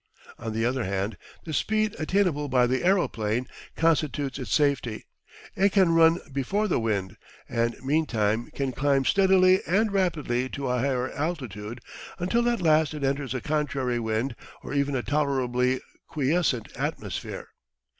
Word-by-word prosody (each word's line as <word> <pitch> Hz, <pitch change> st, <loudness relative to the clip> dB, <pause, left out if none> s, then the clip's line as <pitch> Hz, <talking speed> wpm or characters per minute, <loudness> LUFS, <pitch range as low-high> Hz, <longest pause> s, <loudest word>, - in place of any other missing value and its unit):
On 110 Hz, -, -4 dB
the 115 Hz, +1 st, -1 dB
other 130 Hz, +1 st, 0 dB
hand, 100 Hz, +2 st, -2 dB, 0.3 s
the 160 Hz, -, -6 dB
speed 215 Hz, +7 st, 0 dB
attainable 160 Hz, -3 st, +1 dB
by 125 Hz, -1 st, +4 dB
the 130 Hz, +1 st, 0 dB
aeroplane 125 Hz, -, +1 dB, 0.3 s
constitutes 150 Hz, -4 st, 0 dB
its 125 Hz, -7 st, -6 dB
safety. 140 Hz, -6 st, +1 dB, 0.5 s
It 195 Hz, +1 st, +3 dB
can 185 Hz, -4 st, +4 dB
run 165 Hz, 0 st, +6 dB, 0.2 s
before 195 Hz, +11 st, 0 dB
the 180 Hz, -, +1 dB
wind, 100 Hz, -5 st, -2 dB, 0.3 s
and 115 Hz, 0 st, 0 dB
meantime 120 Hz, -7 st, 0 dB
can 135 Hz, -2 st, -1 dB
climb 135 Hz, 0 st, +1 dB
steadily 190 Hz, 0 st, +5 dB
and 205 Hz, +5 st, +2 dB
rapidly 150 Hz, -10 st, 0 dB
to 140 Hz, -1 st, -4 dB
a 125 Hz, 0 st, +1 dB
higher 130 Hz, 0 st, 0 dB
altitude, 120 Hz, -, -4 dB, 0.4 s
until 235 Hz, +7 st, +1 dB
at 235 Hz, -6 st, -1 dB
last 155 Hz, -1 st, +3 dB
it 150 Hz, -, -5 dB
enters 135 Hz, -2 st, -1 dB
a 130 Hz, -, -2 dB
contrary 140 Hz, -5 st, -1 dB
wind 115 Hz, +3 st, -1 dB, 0.3 s
or -, -, -6 dB
even 140 Hz, -1 st, +1 dB
a 125 Hz, -, -1 dB
tolerably 130 Hz, -3 st, +1 dB, 0.3 s
quiescent 145 Hz, -4 st, 0 dB
atmosphere. -, -, -4 dB
140 Hz, 145 wpm, -26 LUFS, 125-165 Hz, 0.5 s, run